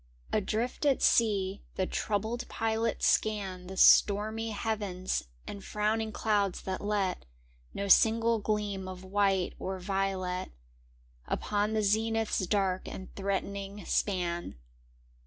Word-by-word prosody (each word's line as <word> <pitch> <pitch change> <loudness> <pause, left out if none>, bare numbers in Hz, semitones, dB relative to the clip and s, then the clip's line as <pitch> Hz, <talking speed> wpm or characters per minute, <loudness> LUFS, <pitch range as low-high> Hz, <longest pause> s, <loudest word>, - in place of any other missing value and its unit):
Adrift 220 +6 -1
at 280 -3 +3
sea, 205 -4 +2
the 185 - 0
troubled 220 +5 -2
pilots 225 0 -1
scan 195 -4 0
The 190 +1 -8
stormy 215 +4 +5
heavens 205 -4 -2 0.2
and 200 -1 -7
frowning 215 +1 -1
clouds 205 -4 0
that 190 0 -3
let 205 -3 -1 0.5
No 200 - -2
single 225 +3 +5
gleam 205 -2 -2
of 185 0 -8
white 195 -1 +1
or 190 0 -3
violet 185 -1 -2 0.8
Upon 210 +1 -1
the 215 -1 +1
zenith's 220 -1 +1
dark 190 -2 0
and 190 - -8
threatening 200 0 -3
span. 175 - -1
205 Hz, 115 wpm, -30 LUFS, 190-220 Hz, 0.8 s, stormy